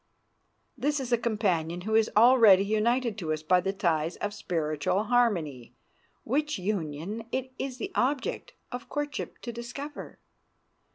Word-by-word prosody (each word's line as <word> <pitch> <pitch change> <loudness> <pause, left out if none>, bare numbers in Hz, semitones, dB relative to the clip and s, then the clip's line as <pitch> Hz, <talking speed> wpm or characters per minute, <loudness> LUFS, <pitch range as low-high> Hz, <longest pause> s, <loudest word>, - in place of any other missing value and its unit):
This 290 +3 0
is 255 -2 -5
a - - +5
companion 185 -7 0
who 215 +4 -3
is 220 0 +4
already 220 -5 +7
united 225 +2 +1
to 160 -4 -3
us 155 0 -2
by 180 +3 +4
the 195 - -1
ties 170 -4 0
of 205 0 -3
spiritual 165 -1 -1
harmony, 185 - 0 0.5
which 300 +5 0
union 185 +2 -3
it 260 0 -2
is 265 -2 -4
the 390 +8 -5
object 265 +2 -1 0.2
of 245 0 -7
courtship 290 0 -4
to 240 - -4
discover. 250 +5 -7
215 Hz, 140 wpm, -28 LUFS, 175-250 Hz, 0.5 s, already